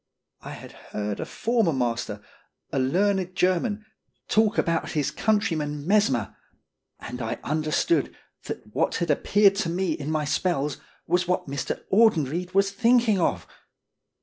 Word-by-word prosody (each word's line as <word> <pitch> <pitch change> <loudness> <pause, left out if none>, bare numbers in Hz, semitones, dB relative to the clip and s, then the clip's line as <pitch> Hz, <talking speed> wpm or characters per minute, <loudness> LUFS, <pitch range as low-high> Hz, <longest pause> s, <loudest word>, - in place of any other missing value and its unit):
I - - -8
had - - -10
heard 105 -1 -5
a - - -3
former 225 -8 +1
master, 115 -5 -2 0.5
a - - 0
learned 185 +6 +1
German, 195 +4 +1 0.4
talk 220 -1 +2
about 165 -1 0
his 150 -3 0
countryman 155 -9 0
Mesmer, 180 - +2 0.6
and 125 +2 -7
I 115 - -3
under 155 +1 -1
stood 155 -2 +1 0.3
that - - -6
what - - +1
had 170 -2 0
appeared 200 +6 +4
to 185 -5 -1
me 180 +1 -1
in 150 -1 -4
my 155 -1 0
spells 145 -1 0 0.3
was 180 +1 +1
what 180 - 0
Mr. 140 0 -4
Audenried 180 - +2
was 195 0 +3
thinking 230 -1 +3
of! 170 - 0
170 Hz, 145 wpm, -25 LUFS, 145-200 Hz, 0.6 s, appeared